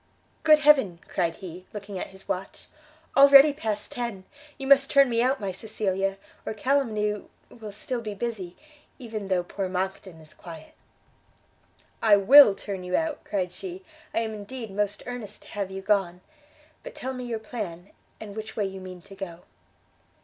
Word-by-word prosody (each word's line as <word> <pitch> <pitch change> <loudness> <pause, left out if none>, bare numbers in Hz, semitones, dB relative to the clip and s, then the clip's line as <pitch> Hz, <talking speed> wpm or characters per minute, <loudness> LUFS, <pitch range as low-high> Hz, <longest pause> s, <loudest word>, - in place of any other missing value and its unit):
"Good 310 -1 +7
Heaven!" 280 - +4
cried 170 -3 -1
he, 185 -1 -10
looking 200 -2 -6
at - - -4
his 190 0 -13
watch, 190 +1 -5 0.5
"already 280 +1 +9
past 220 -8 -3
ten! 235 -6 -4 0.3
you 270 - -6
must 275 0 +5
turn 275 -2 +5
me 230 0 +2
out, 260 +2 +2
my 200 -2 -3
Cecilia, 195 -1 -2 0.3
or - - -4
calumny 215 -4 0 0.3
will 220 -3 -9
still 235 +4 -4
be 210 -2 -5
busy, 200 -5 -4 0.4
even 220 -6 -6
though 185 -2 +1
poor 190 +2 -4
Monckton 185 -2 -4
is 155 -1 -14
quiet." 165 -3 -11 1.3
"I 215 -2 +6
will 215 +2 +8
turn 195 -3 -6
you 180 0 -1
out," 320 -2 -1
cried 185 -3 -2
she, 375 - -8 0.3
"I 225 - 0
am 220 -1 -3
indeed 215 +2 -7
most 205 +1 -2
earnest 245 -4 -7
to - - -16
have 200 -2 -3
you 190 0 -7
gone. 190 -3 +1 0.6
But - - -10
tell 260 +1 -4
me 250 -1 -6
your 235 -2 -2
plan, 205 -5 -7 0.3
and 205 -2 -9
which 220 0 -7
way 210 - 0
you 190 0 -6
mean 185 -1 -10
to 195 - -14
go?" 185 -3 -8
210 Hz, 170 wpm, -26 LUFS, 190-245 Hz, 1.3 s, already